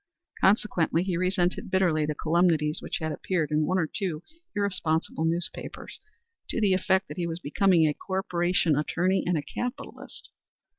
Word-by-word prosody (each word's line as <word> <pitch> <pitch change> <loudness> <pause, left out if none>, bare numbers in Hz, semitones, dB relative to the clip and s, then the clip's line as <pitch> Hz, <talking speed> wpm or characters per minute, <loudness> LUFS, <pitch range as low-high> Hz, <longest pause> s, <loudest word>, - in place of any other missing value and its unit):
Consequently 190 -4 +2
he 185 -2 -1
resented 180 +1 0
bitterly 175 -5 +2
the 150 - -2
calumnies 160 -1 +2
which - - -3
had 155 0 -3
appeared 155 0 -1
in 150 0 +2
one 185 - +1
or 175 - +2
two 170 -1 -3 0.3
irresponsible 180 -5 0
newspapers 170 +1 -3 0.5
to - - -1
the 205 -4 +3
effect 190 0 +2
that - - -8
he 175 -1 -1
was 165 -1 -3
becoming 175 +1 +3
a 150 - +1
corporation 175 -3 0
attorney 180 +6 +1
and 175 -2 +2
a 145 - -2
capitalist. 245 +11 -6
175 Hz, 155 wpm, -27 LUFS, 160-190 Hz, 0.5 s, the